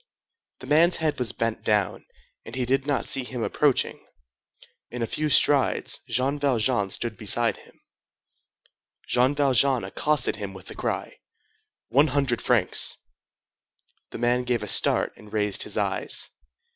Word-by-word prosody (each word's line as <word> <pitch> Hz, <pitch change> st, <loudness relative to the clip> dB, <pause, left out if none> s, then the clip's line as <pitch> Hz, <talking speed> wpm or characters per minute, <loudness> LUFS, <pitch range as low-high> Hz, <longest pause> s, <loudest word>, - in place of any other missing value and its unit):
The -, -, -8 dB
man's 165 Hz, +4 st, +4 dB
head 155 Hz, -4 st, -1 dB
was 120 Hz, -5 st, -1 dB
bent 115 Hz, -1 st, -2 dB
down, 105 Hz, -4 st, 0 dB, 0.4 s
and 115 Hz, -, -9 dB
he 130 Hz, -1 st, -1 dB
did 135 Hz, +2 st, 0 dB
not 145 Hz, -2 st, -1 dB
see 135 Hz, -, -1 dB
him 125 Hz, -2 st, -5 dB
approaching. 145 Hz, +1 st, 0 dB, 0.9 s
In 120 Hz, -1 st, -4 dB
a -, -, +1 dB
few 155 Hz, +6 st, -2 dB
strides 145 Hz, -1 st, +2 dB
Jean 135 Hz, +3 st, 0 dB
Valjean 120 Hz, -6 st, +1 dB
stood 115 Hz, +3 st, -2 dB
beside 110 Hz, +1 st, +1 dB
him. -, -, -19 dB, 1.3 s
Jean 125 Hz, +3 st, +2 dB
Valjean 135 Hz, -2 st, +2 dB
accosted 150 Hz, -7 st, 0 dB
him 100 Hz, -2 st, -6 dB
with 95 Hz, -, -12 dB
the -, -, -9 dB
cry:— -, -, -4 dB, 0.7 s
"One 140 Hz, +7 st, +4 dB
hundred 135 Hz, -4 st, 0 dB
francs!" 120 Hz, -7 st, +2 dB, 1.1 s
The -, -, -8 dB
man 120 Hz, +1 st, +1 dB
gave 125 Hz, -2 st, -1 dB
a -, -, -5 dB
start -, -, +2 dB
and 105 Hz, -1 st, -15 dB
raised 105 Hz, -2 st, +2 dB
his -, -, -3 dB
eyes. -, -, -1 dB
125 Hz, 145 wpm, -25 LUFS, 115-140 Hz, 1.3 s, man's